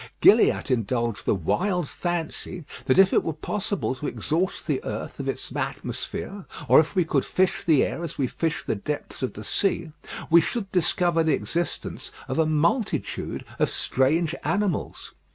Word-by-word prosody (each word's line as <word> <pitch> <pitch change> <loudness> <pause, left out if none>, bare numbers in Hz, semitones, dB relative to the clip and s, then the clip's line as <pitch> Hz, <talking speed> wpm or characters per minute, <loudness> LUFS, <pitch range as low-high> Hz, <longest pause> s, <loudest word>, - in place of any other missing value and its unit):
Gilliatt - - +5
indulged 115 -3 0
the - - +4
wild 180 - 0
fancy 175 0 -4 0.2
that 130 - +3
if 190 0 +6
it - - +4
were 160 - -2
possible 200 0 -2
to 140 +3 -5
exhaust 175 +4 -1
the - - -1
earth - - -5
of - - -2
its - - -3
atmosphere, 200 -1 -4 0.2
or - - +8
if 160 +5 +1
we 180 -3 +3
could 145 -4 +1
fish 185 0 +1
the 155 -5 +4
air 170 - -3
as 165 - -5
we 140 - +1
fish 160 +5 -2
the - - -1
depths 145 +8 -5
of 130 - -2
the 105 - -8
sea, 170 - 0 0.4
we 170 0 +8
should 195 +3 -3
discover 175 -1 +2
the 160 -2 +3
existence 170 -2 -3 0.2
of 130 - -2
a 160 - +4
multitude 165 - 0
of - - +3
strange 155 +6 +1
animals. 205 -3 -1
165 Hz, 170 wpm, -25 LUFS, 140-180 Hz, 0.4 s, or